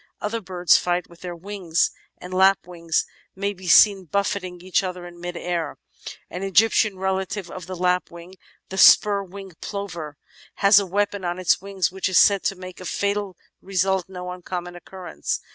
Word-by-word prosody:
Other 225 +2 -3
birds 180 -2 +3
fight 180 0 -1
with 170 - -17
their 180 -1 -6
wings, 175 -3 -1 0.3
and 180 +1 -9
lapwings 180 -3 +2 0.3
may 200 +1 -2
be 185 -1 -11
seen 195 +1 +6
buffeting 190 0 -2
each 185 +2 0
other 180 -2 -5
in 175 0 -12
mid 175 0 -5
air; 170 -4 -3 0.5
an 180 - -7
Egyptian 205 +1 +3
relative 190 0 -2
of 180 -2 -8
the 185 - -5
Lapwing, 180 0 -2 0.4
the 190 - -4
Spur 200 0 +7
winged 195 -2 -11
Plover, 175 -8 -6 0.4
has 200 0 +6
a 200 - -3
weapon 205 +1 -1
on 175 0 -2
its 185 0 +2
wings 195 -2 -1
which 190 0 -2
is 185 - +2
said 200 -2 +6
to 195 - +1
make 185 -1 -10
a - - -8
fatal 200 -1 -2 0.2
result 190 -1 0
no 180 -1 -6
uncommon 180 -1 -6
occurrence. 175 - -5
185 Hz, 170 wpm, -23 LUFS, 175-195 Hz, 0.5 s, Spur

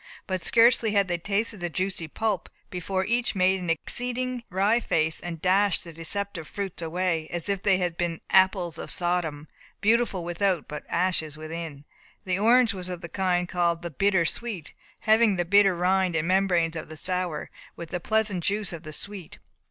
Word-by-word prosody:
But 185 -2 -2
scarcely 230 +2 +4
had 200 -2 +3
they 175 -1 -1
tasted 210 +4 -1
the 175 0 -2
juicy 185 -1 -2
pulp, 210 +2 -2 0.2
before 190 +1 -2
each 235 +1 0
made 190 0 +3
an 180 -2 -5
exceeding 245 +8 -2
wry 200 +5 +2
face, 160 -7 0
and 170 -2 -6
dashed 190 +3 +3
the 170 -2 -9
deceptive 165 +1 -4
fruits 195 -4 -4
away, 165 -1 -1
as 175 0 -3
if 200 -2 0
they 195 -2 +3
had 175 -2 -2
been 170 -2 -2
apples 185 -3 +3
of - - -6
Sodom, 170 -4 -1 0.3
beautiful 220 -4 +2
without, 175 0 0
but 150 0 -7
ashes 170 -4 +1
within. 155 -2 -7 0.4
The 185 0 0
orange 235 +2 +5
was 185 -1 -6
of 180 -1 -5
the 170 - -7
kind 180 -2 0
called 175 -2 0
the 170 - -4
"bitter 190 +2 +2
sweet," 205 -3 -4 0.3
having 220 -1 +4
the 175 -1 -1
bitter 200 +1 +5
rind 185 0 +1
and 160 0 0
membranes 180 -3 +2
of 160 - -6
the 155 - -9
sour, 180 -3 -3 0.2
with 170 -1 -8
the 180 - -3
pleasant 210 -2 0
juice 205 0 0
of 165 - -6
the 155 -2 -8
sweet. 200 -1 -5
185 Hz, 185 wpm, -26 LUFS, 170-200 Hz, 0.4 s, orange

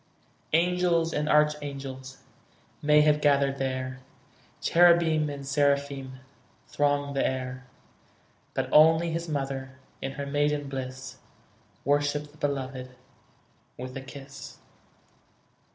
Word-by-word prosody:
Angels 170 -1 +2
and 150 +1 -1
archangels 140 -3 -1 0.6
May 150 0 +5
have 150 0 +3
gathered 140 -1 +2
there, 130 -1 -3 0.6
Cherubim 170 -3 +4
and 140 -1 -7
seraphim 140 -2 0 0.5
Thronged 145 -1 0
the 135 - +2
air; 130 0 -3 0.9
But - - -1
only 160 +2 +6
His 165 +1 -3
mother, 135 -2 -4 0.2
In 135 - -4
her 140 0 -5
maiden 145 0 0
bliss, 130 -1 -6 0.7
Worshipped 145 +1 0
the 150 - -20
Beloved 130 -3 -3 0.8
With 130 +1 -7
a 135 - -5
kiss. 135 0 -10
140 Hz, 105 wpm, -27 LUFS, 135-150 Hz, 0.9 s, only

